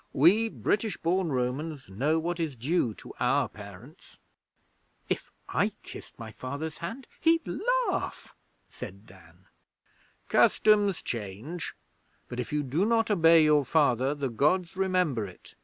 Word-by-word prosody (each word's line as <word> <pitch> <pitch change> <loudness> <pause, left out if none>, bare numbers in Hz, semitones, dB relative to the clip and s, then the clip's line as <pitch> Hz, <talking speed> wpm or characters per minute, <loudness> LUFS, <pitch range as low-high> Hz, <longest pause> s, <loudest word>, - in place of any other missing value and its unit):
We 200 +11 +5
British 215 -1 -1
born 175 0 0
Romans 135 +3 -2
know 135 +12 0
what 170 +2 -2
is 160 -5 -2
due 125 -2 0
to - - -11
our - - +2
parents.' 105 - -13 0.9
'If - - -2 0.2
I - - 0
kissed - - -11
my 115 -1 -8
Father's 145 +6 -6
hand, 230 +10 -6
he'd 330 0 +3 0.4
laugh,' - - -3 0.3
said - - -9
Dan. - - -18 0.8
'Customs 205 -3 +4
change; 115 - -5 0.5
but 120 - -6
if 125 - -4
you 150 0 0
do 145 +7 0
not 225 0 +2
obey 165 -4 +6
your 150 -1 +4
Father, 135 -2 +2
the 140 -2 -2
Gods 160 +10 +1
remember 180 - +1
it. 90 - -15
155 Hz, 135 wpm, -28 LUFS, 125-180 Hz, 0.9 s, obey